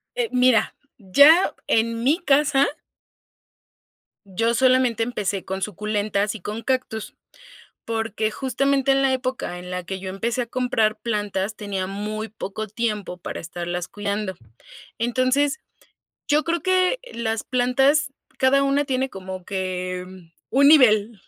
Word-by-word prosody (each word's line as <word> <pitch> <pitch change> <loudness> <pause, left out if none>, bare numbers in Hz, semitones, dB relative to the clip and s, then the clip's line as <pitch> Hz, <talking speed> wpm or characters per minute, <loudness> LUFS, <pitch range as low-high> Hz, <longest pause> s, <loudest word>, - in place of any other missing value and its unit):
Eh, 485 -2 -1
mira, 250 -3 +3 0.2
ya 285 - +5
en 230 +1 +1
mi 295 +7 +3
casa 285 -3 +3 1.6
yo 225 +5 0
solamente 255 -2 +3
empecé 205 -5 -3
con 190 0 -4
suculentas 210 +1 -1
y 215 - -9
con 210 +5 -5
cactus. 255 -4 -2 0.7
Porque, 225 -1 -2
justamente, 275 +2 0
en 270 0 +3
la 270 -1 +3
época 255 -8 -3
en 180 0 -9
la 180 -1 -4
que 190 +1 -5
yo 190 - -6
empecé 230 +6 -2
a - - -6
comprar 230 -3 0
plantas 210 -2 -2
tenía 200 -3 -4
muy 210 +3 -4
poco 215 0 -6
tiempo 210 -4 -3
para 180 - -6
estarlas 175 +1 -4
cuidando. 205 0 -3 0.6
Entonces, 255 +6 +1 0.7
yo 300 +1 +3
creo 335 0 -1
que 370 +5 +2
las 225 -1 -2
plantas 270 +4 +2 0.3
cada 265 +1 +4
una 275 +1 +1
tiene 265 -1 -1
como 185 -3 -8
que 185 -1 -3 0.5
un 275 +3 +5
nivel 225 -7 +5
225 Hz, 135 wpm, -23 LUFS, 200-265 Hz, 1.6 s, ya